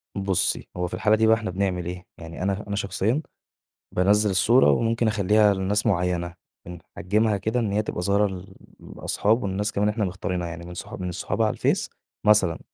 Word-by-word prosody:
بُصّي، 95 -2 0
هو 90 0 -1
في - - -10
الحالة 110 0 +2
دي 110 +1 +2
بقى 110 - +6
إحنا 110 -3 -4
بنعمل 90 -2 -1
إيه؟ 90 +1 -7
يعني 80 +1 -8
أنا 100 +1 -1
أنا 100 - -3
شخصيًا 105 +6 -1 0.7
بانزِّل 105 +3 +3
الصورة 115 +7 +4
وممكن 115 0 +1
أخلّيها 105 0 +3
لناس 100 +2 0
معيّنة. 90 -4 0 0.3
بِنحَجِّمها 100 +5 -1
كده 110 +5 -1
إن 110 -4 -1
هي 105 +2 +1
تبقى 105 - -4
ظاهرة 100 +3 +2
ل 95 -1 -9 0.4
لأصحاب 110 +4 0
والناس 100 +2 -1
كمان 105 0 +1
إحنا 105 0 -1
مختارينها 90 -1 -3
يعني 85 0 -8
من 90 - -9
الصحا 90 - -7
من 90 -1 -4
الصحاب 85 - -3
على - - +2
الفيس - - 0 0.4
مثلًا 105 -6 +4
100 Hz, 185 wpm, -24 LUFS, 90-105 Hz, 0.7 s, بقى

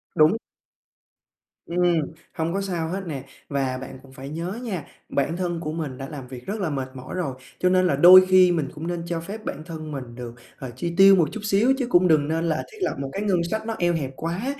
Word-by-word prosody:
Đúng. 155 +8 +5 1.3
Ừm, 175 -1 +2 0.3
hông 165 +1 -2
có 195 - -1
sao 175 -4 -2
hết 190 +3 -3
nè. 140 -4 -5 0.3
Và 135 -2 -1
bạn 130 0 -9
cũng 135 - -16
phải 135 0 -8
nhớ 170 +8 -4
nha, 185 - -4 0.2
bản 155 +5 0
thân 175 -2 -2
của 155 -2 -4
mình 150 -6 -4
đã 135 - -6
làm 135 -4 -8
việc 125 -1 -10
rất 205 +2 -4
là 180 -5 -1
mệt 135 -2 -3
mỏi 130 0 -7
rồi, 155 -8 -2 0.2
cho 180 - +3
nên 185 0 +4
là 140 - +2
đôi 185 +5 +9
khi 185 -1 +6
mình 155 -6 -1
cũng 160 +3 -5
nên 175 -1 -3
cho 170 -1 -2
phép 205 +6 -8
bản 150 - -5
thân 155 -2 -7
mình 125 -4 -7
được, 120 -1 -7 0.3
ờ, 130 -2 -6
chi 170 +6 -3
tiêu 195 0 +8
một 165 -6 +2
chút 220 - -6
xíu 215 +6 +3
chứ 255 -3 -1
cũng 180 -4 +5
đừng 150 -3 +3
nên 165 +2 0
là 155 - 0
thiết 435 - -14
lập 365 - 0
một 135 -1 -3
cái 200 - -3
ngân 190 -4 +1
sách 220 0 -2
nó 225 0 -3
eo 175 0 +2
hẹp 140 -5 -2
quá. 190 - -3
165 Hz, 245 wpm, -24 LUFS, 140-185 Hz, 1.3 s, đôi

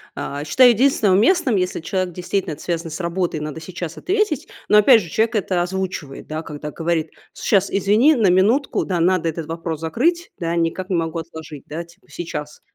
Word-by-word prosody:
А, 145 +1 -4
считаю 250 - +6
единственное 230 -4 +3
уместным, 250 - +3
если 180 0 -1
человек 185 +1 -2
действительно 180 -1 -2
это 145 - -11
связан 170 -1 -2
с 160 - -5
работой, 170 -1 -1
надо 150 +1 -5
сейчас 170 -1 -6
ответить, 390 -7 0 0.2
но 210 - +6
опять 225 +1 +6
же 170 - -9
человек 225 +1 +1
это 185 -3 0
озвучивает, 180 -6 -4
да, 155 +1 -4
когда 150 -1 -7
говорит: 165 -1 -1 0.2
"Сейчас, 200 -1 +1
извини, 215 +10 +4
на 220 -7 +3
минутку 220 +10 +2
да, 180 -3 -1
надо 175 -1 +2
этот 160 0 -5
вопрос 165 -1 -4
закрыть 330 - 0
да, 170 0 -1
никак 170 +2 -1
не 185 - 0
могу 165 0 -1
отложить 160 -3 -9
да, 165 +3 -5
типа 170 +4 -23
сейчас 150 -3 -6
180 Hz, 190 wpm, -21 LUFS, 165-210 Hz, 0.2 s, считаю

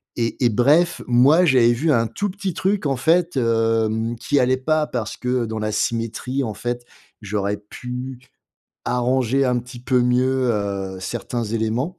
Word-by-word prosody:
et 120 +2 -2
et 120 - +5
bref, 150 +10 +3
moi 135 +9 +5
j'avais 125 -6 +5
vu 150 +7 +1
un 115 -4 +2
tout 205 - -3
petit 195 -2 -4
truc 195 -1 0
en 135 - 0
fait, 165 +2 +2
hem, 115 -1 +1
qui 140 +5 0
allait 130 +1 +2
pas. 155 +3 0
Parce 115 -3 -4
que 125 -1 -1
dans 110 -1 -4
la 110 0 -2
symétrie 115 +5 -2
en 110 -3 -3
fait, 120 0 -4 0.4
j'aurais 105 0 -2
pu 125 +5 -7 0.7
arranger 125 +2 +1
un 125 -1 +1
petit 125 0 -9
peu 125 0 +1
mieux, 125 +1 +2
heu, 100 -2 -3
certains 120 +4 -4
éléments 115 +8 -2
125 Hz, 165 wpm, -21 LUFS, 115-135 Hz, 0.7 s, et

